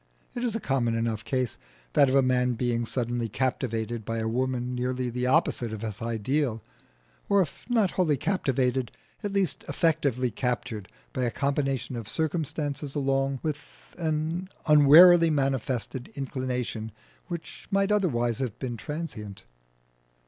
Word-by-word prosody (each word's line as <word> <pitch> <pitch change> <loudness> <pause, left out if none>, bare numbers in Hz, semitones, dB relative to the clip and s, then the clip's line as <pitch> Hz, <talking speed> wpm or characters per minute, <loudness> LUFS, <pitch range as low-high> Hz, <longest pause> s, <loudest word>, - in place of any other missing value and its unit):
It 240 - -4
is 235 -3 0
a - - 0
common 125 - 0
enough 115 -1 -1
case, 125 0 -1 0.3
that 140 - +5
of 130 - +1
a 135 - +5
man 125 -1 +2
being 120 -1 -1
suddenly 120 -2 -1
captivated 115 -2 -2
by 115 +2 -3
a 110 0 -1
woman 125 +1 -1
nearly 125 0 -1
the 125 +1 -1
opposite 120 -2 +2
of 110 0 -6
his 105 -2 -5
ideal; 115 +2 -1 0.7
or 200 - +5
if 180 - -2
not 225 -6 +3
wholly 160 -6 +2
captivated, 130 - 0 0.3
at 205 - -2
least 195 -3 0
effectively 145 -5 +1
captured 120 -3 -3 0.3
by - - -2
a - - +1
combination 135 -1 -1
of 115 -2 -6
circumstances 150 -1 -2
along 135 -1 0
with 150 -2 -2 0.4
an 165 +3 -1 0.2
unwarily 165 +3 +8
manifested 135 -3 -1
inclination 125 -5 -3 0.4
which 170 -2 -7
might 195 0 +2
otherwise 120 - +1
have 125 -4 -3
been 120 -3 -4
transient. 110 - -6
130 Hz, 140 wpm, -27 LUFS, 120-150 Hz, 0.7 s, unwarily